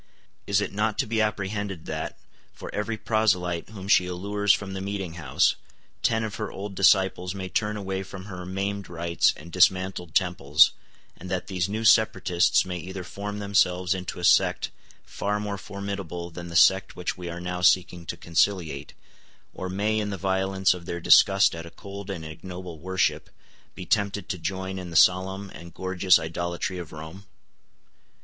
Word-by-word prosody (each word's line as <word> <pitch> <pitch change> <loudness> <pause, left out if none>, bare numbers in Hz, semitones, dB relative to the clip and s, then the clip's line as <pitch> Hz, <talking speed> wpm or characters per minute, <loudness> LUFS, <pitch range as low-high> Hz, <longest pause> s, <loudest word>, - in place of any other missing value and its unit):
Is 100 0 +2
it 100 - -3
not 105 +1 0
to - - +1
be 110 0 0
apprehended 100 -4 -2
that, - - -4 0.4
for - - -9
every 105 +2 -2
proselyte 90 -7 0
whom 100 -3 -9
she 90 -2 +4
allures 100 +3 0
from 100 -1 0
the 95 - -4
meeting 95 -3 -4
house, 80 -6 +1 0.4
ten 110 -1 +2
of 110 -2 -4
her - - -4
old 100 +1 -6
disciples 95 -1 +3
may 95 -1 -5
turn 105 +1 -1
away 95 -1 -3
from 95 0 -9
her 90 -3 -7
maimed 100 +1 -3
rites 85 -1 +2
and 85 +3 -12
dismantled 90 -2 +2
temples, 80 -5 +4 0.4
and 90 - -10
that 90 -1 -2
these 95 -2 -2
new 110 +2 -3
separatists 105 -6 +4
may 90 -1 -4
either 95 +3 -6
form 100 +3 -6
themselves 95 -3 +2
into 90 -1 -5
a - - -7
sect - - +3 0.3
far 105 +1 -2
more 105 -1 -4
formidable 100 -4 -6
than 85 +1 -8
the 85 - -8
sect 95 +3 +5
which 90 - -3
we 90 -1 -7
are 85 +1 -6
now 90 0 -4
seeking 90 -1 +3
to 85 - -4
conciliate, 85 -4 0 0.6
or 95 - -5
may, 105 +3 0
in 105 -1 -2
the 100 - -4
violence 95 0 +1
of 90 -2 -10
their 85 - -3
disgust - - +6
at 85 0 -7
a - - -9
cold 100 +3 -9
and 85 -5 -5
ignoble 90 +1 -8
worship, 95 +2 0 0.5
be 90 - -7
tempted 100 -3 0
to 90 - -3
join 95 +2 -3
in 90 -1 -7
the 85 - -9
solemn 95 +3 +3
and 85 0 -12
gorgeous 95 0 +3
idolatry 85 +3 -3
of 85 -3 -8
Rome? 80 +6 -10
95 Hz, 175 wpm, -26 LUFS, 90-100 Hz, 0.6 s, disgust